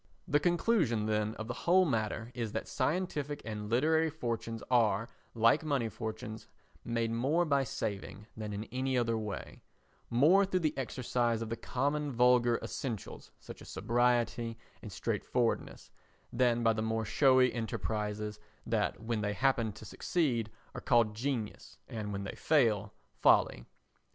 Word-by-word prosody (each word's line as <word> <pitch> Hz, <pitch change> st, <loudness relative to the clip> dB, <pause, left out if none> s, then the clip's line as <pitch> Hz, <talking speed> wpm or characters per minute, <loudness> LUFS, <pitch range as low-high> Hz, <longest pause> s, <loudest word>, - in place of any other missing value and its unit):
The 145 Hz, -, +3 dB
conclusion, 170 Hz, -, +2 dB
then, 105 Hz, 0 st, 0 dB
of 110 Hz, -, -6 dB
the 120 Hz, -, -3 dB, 0.2 s
whole 185 Hz, +1 st, +6 dB
matter 110 Hz, -3 st, -2 dB
is 115 Hz, -4 st, -4 dB
that 110 Hz, -, -3 dB
scientific 145 Hz, 0 st, -1 dB
and 105 Hz, -1 st, -5 dB
literary 160 Hz, +7 st, +3 dB
fortunes 115 Hz, -6 st, -4 dB
are, 115 Hz, -3 st, +3 dB, 0.3 s
like 115 Hz, +7 st, +4 dB
money 140 Hz, -7 st, 0 dB
fortunes, 110 Hz, 0 st, -6 dB, 0.4 s
made 115 Hz, -1 st, -1 dB
more 140 Hz, +9 st, +1 dB
by 140 Hz, -3 st, +2 dB
saving 100 Hz, -2 st, -4 dB
than 110 Hz, -1 st, -5 dB
in 105 Hz, +1 st, -4 dB
any 130 Hz, 0 st, 0 dB
other 115 Hz, -2 st, +1 dB
way—more 120 Hz, -, 0 dB
through 185 Hz, -2 st, 0 dB
the 155 Hz, -2 st, 0 dB
exercise 120 Hz, -3 st, -1 dB
of 110 Hz, -, -6 dB
the 115 Hz, -, -2 dB
common 145 Hz, +5 st, -1 dB
vulgar 125 Hz, -1 st, +4 dB
essentials, 115 Hz, -7 st, -5 dB
such -, -, -11 dB
as -, -, -11 dB
sobriety 120 Hz, -1 st, +1 dB, 0.2 s
and -, -, -8 dB
straightforwardness, 120 Hz, -2 st, -2 dB, 0.4 s
than 120 Hz, -2 st, +2 dB
by 115 Hz, 0 st, +4 dB
the 110 Hz, -, -2 dB
more 110 Hz, 0 st, -1 dB
showy 130 Hz, +1 st, +4 dB
enterprises 105 Hz, -2 st, -3 dB, 0.3 s
that -, -, -1 dB
when 115 Hz, -1 st, -1 dB
they 105 Hz, 0 st, -1 dB
happen 120 Hz, -2 st, +1 dB
to 110 Hz, -, -11 dB
succeed 125 Hz, -11 st, 0 dB, 0.2 s
are -, -, -6 dB
called 115 Hz, -3 st, +3 dB
genius 115 Hz, -2 st, -4 dB
and 110 Hz, -3 st, -5 dB
when 100 Hz, 0 st, -3 dB
they 95 Hz, -, -5 dB
fail, 110 Hz, -9 st, +2 dB, 0.3 s
folly. -, -, +3 dB
115 Hz, 145 wpm, -32 LUFS, 110-135 Hz, 0.4 s, whole